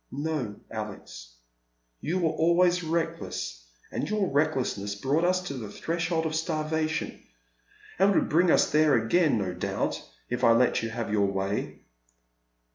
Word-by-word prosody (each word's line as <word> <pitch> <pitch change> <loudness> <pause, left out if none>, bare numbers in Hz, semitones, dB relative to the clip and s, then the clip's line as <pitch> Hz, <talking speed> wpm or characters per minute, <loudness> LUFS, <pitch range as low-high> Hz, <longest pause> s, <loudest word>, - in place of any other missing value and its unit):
'' - - -47
" - - -43 0.2
No, 125 -10 -2 0.2
Alex. 100 - -8 0.6
You 170 +5 -1
were 165 -3 +1
always 175 +2 +3
reckless, 155 - -3 0.3
and - - -3
your 210 -3 0
recklessness 125 -8 0
brought 135 +10 0
us 185 +1 +2
to 160 - -5
the 115 -6 -6
threshold 165 - -2
of 160 - -1
starvation, 155 0 -2 0.8
and 200 0 +4
would - - +2
bring 175 +3 +3
us - - +4
there 150 -1 +4
again, 120 +5 +3
no 95 -3 -2
doubt, - - -2 0.3
if 125 - -3
I 115 - +7
let 120 +2 +3
you 115 - -3
have 115 -1 -4
your 100 -2 +3
way." 95 +1 -3
150 Hz, 155 wpm, -27 LUFS, 110-165 Hz, 0.8 s, I